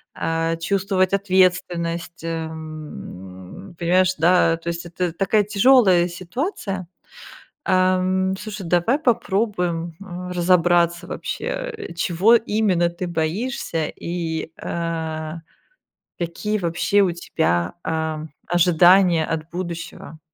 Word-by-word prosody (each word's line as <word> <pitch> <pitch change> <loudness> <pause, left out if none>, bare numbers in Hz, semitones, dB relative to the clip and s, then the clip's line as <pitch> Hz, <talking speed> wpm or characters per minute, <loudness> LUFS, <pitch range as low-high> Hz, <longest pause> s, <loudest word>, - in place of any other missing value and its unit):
а, 165 0 -1
чувствовать 190 +2 0
ответственность, 180 -4 +1
эм, 155 - -7
понимаешь, 185 +2 +3
да? 165 0 +4
То 170 +1 -5
есть 170 0 -4
это 175 0 -2
такая 200 +3 +2
тяжёлая 200 -4 +5
ситуация. 185 - -4 0.8
Ам, 185 0 +2
слушай, 210 -2 -6
давай 180 - +2
попробуем, 190 - 0
а, 180 -1 -7
разобраться 175 -1 +3
вообще, - - -5
э, - - -4
чего 180 +7 +3
именно 210 -6 +2
ты 175 +2 -5
боишься, 170 - -2
и, 165 -2 -4
а, 160 -1 -3 0.8
какие 175 +5 -2
вообще 175 +4 +1
у 185 - +3
тебя, 85 - -1
а, 160 -1 -2 0.2
ожидания 175 0 +5
от 160 0 -4
будущего? 170 -2 -6
175 Hz, 100 wpm, -22 LUFS, 165-190 Hz, 0.8 s, тяжёлая